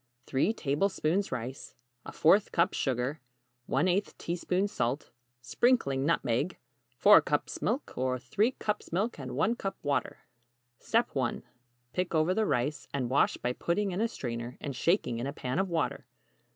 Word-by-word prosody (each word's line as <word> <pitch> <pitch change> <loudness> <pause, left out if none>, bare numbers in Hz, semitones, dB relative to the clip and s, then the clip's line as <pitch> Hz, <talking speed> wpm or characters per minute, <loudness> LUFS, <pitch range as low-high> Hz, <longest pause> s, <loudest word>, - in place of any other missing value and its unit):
3 135 +10 +1
tablespoons 185 +1 0
rice 130 +1 -5 0.3
¼ 190 +6 +3
cup 170 +1 +2
sugar 135 +3 -1 0.5
1/8 180 +8 +1
teaspoon 180 +3 -1
salt 125 - -2 0.3
sprinkling 140 - +2
nutmeg 145 +1 0 0.4
4 - - +8
cups - - -2
milk, - - -1
or 130 0 0
3 210 - +1
cups 210 -3 -3
milk 195 +3 -1
and 130 -2 -6
1 215 - +2
cup 195 -3 -4
water 145 -1 -1 0.9
1. 130 -4 -1 0.5
Pick 180 -2 -1
over 160 +3 +3
the 215 +1 +1
rice, 140 +5 -1
and 130 -3 -2
wash 140 - +3
by 125 0 -2
putting 195 +8 -1
in 185 +4 -2
a 230 - +3
strainer 120 - -5
and 140 -2 -5
shaking 125 - +1
in 125 - -2
a 140 - -4
pan 130 +2 -2
of 190 0 0
water. 165 -3 -1
155 Hz, 150 wpm, -30 LUFS, 130-190 Hz, 0.9 s, 4